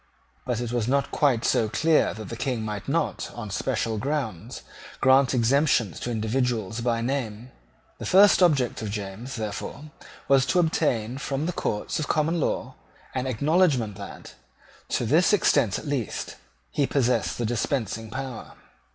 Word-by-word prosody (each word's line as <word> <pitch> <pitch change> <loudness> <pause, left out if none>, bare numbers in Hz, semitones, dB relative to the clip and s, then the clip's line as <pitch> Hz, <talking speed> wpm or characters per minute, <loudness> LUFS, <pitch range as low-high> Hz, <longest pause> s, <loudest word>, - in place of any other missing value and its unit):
But 120 -2 -1
it 120 -1 -3
was 120 -2 -1
not 140 +2 +1
quite 130 -6 +2
so 110 - +2
clear 160 +3 +2
that 110 -1 -8
the 115 - -5
King 120 -1 -2
might 105 -2 -5
not, - - -1
on 110 -4 -6
special 110 0 -1
grounds, 135 - -3 0.4
grant 130 0 +4
exemptions 125 - +2
to - - -4
individuals 115 -1 -1
by 115 -1 0
name. 120 -2 -3 0.5
The - - -5
first 195 +1 +6
object 140 -11 +3
of 110 - -3
James, 105 +4 -5
therefore, 110 +7 -5 0.4
was 135 -1 +4
to 180 - +2
obtain 130 -8 0
from 140 +1 -2
the 175 - -2
courts 105 +2 -2
of 155 - -2
common 160 +2 +1
law - - -1 0.4
an 130 0 -2
acknowledgment 135 - +2
that, 100 - -9 0.6
to 120 - 0
this 160 - +4
extent 145 - +3
at - - -8
least, 140 -6 -3 0.4
he 140 -2 +1
possessed 125 -3 +1
the 120 - -1
dispensing 115 -1 -2
power. 130 -1 -6
125 Hz, 155 wpm, -25 LUFS, 110-140 Hz, 0.6 s, first